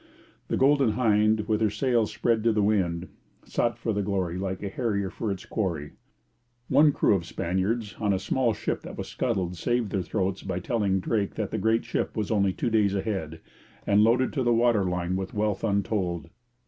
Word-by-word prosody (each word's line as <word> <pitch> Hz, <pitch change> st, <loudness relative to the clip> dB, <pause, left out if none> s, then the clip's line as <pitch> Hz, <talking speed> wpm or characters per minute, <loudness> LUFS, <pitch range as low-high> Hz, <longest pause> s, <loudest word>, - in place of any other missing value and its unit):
The -, -, -1 dB
Golden 135 Hz, -4 st, +4 dB
Hind, 110 Hz, -2 st, +3 dB
with 110 Hz, 0 st, +1 dB
her 110 Hz, -, +3 dB
sails 115 Hz, +1 st, +1 dB
spread 115 Hz, -2 st, +1 dB
to 115 Hz, -, +5 dB
the 105 Hz, -1 st, +1 dB
wind, 90 Hz, -4 st, +1 dB, 0.4 s
sought 120 Hz, -, 0 dB
for 115 Hz, -, -2 dB
the 105 Hz, -, 0 dB
Glory 95 Hz, -4 st, -1 dB
like 95 Hz, +1 st, -3 dB
a -, -, -2 dB
harrier 100 Hz, -3 st, -1 dB
for 110 Hz, -, -3 dB
its 95 Hz, -1 st, -5 dB
quarry. 85 Hz, -9 st, -2 dB, 0.8 s
One 150 Hz, 0 st, +6 dB
crew 135 Hz, -, +2 dB
of 95 Hz, -4 st, 0 dB
Spaniards 95 Hz, +6 st, -2 dB
on 105 Hz, -2 st, +1 dB
a 95 Hz, -, +2 dB
small 115 Hz, +5 st, +1 dB
ship -, -, -3 dB
that -, -, -9 dB
was -, -, -5 dB
scuttled 95 Hz, -8 st, -2 dB
saved 120 Hz, +2 st, 0 dB
their 95 Hz, -, 0 dB
throats 95 Hz, +2 st, -2 dB
by -, -, -3 dB
telling 100 Hz, -1 st, 0 dB
Drake 105 Hz, 0 st, -1 dB
that -, -, -3 dB
the -, -, -2 dB
great 110 Hz, +1 st, +1 dB
ship -, -, -2 dB
was 105 Hz, -1 st, -1 dB
only 100 Hz, -3 st, +2 dB
two 115 Hz, +5 st, -2 dB
days 105 Hz, -3 st, +2 dB
ahead, 95 Hz, -6 st, -3 dB, 0.4 s
and 105 Hz, +1 st, +4 dB
loaded 125 Hz, +3 st, +3 dB
to 140 Hz, -, -1 dB
the 120 Hz, -2 st, +3 dB
water 115 Hz, -4 st, +3 dB
line 90 Hz, 0 st, -1 dB
with 95 Hz, +1 st, -4 dB
wealth 105 Hz, -2 st, -1 dB
untold. 100 Hz, -6 st, -1 dB
105 Hz, 200 wpm, -26 LUFS, 95-115 Hz, 0.8 s, One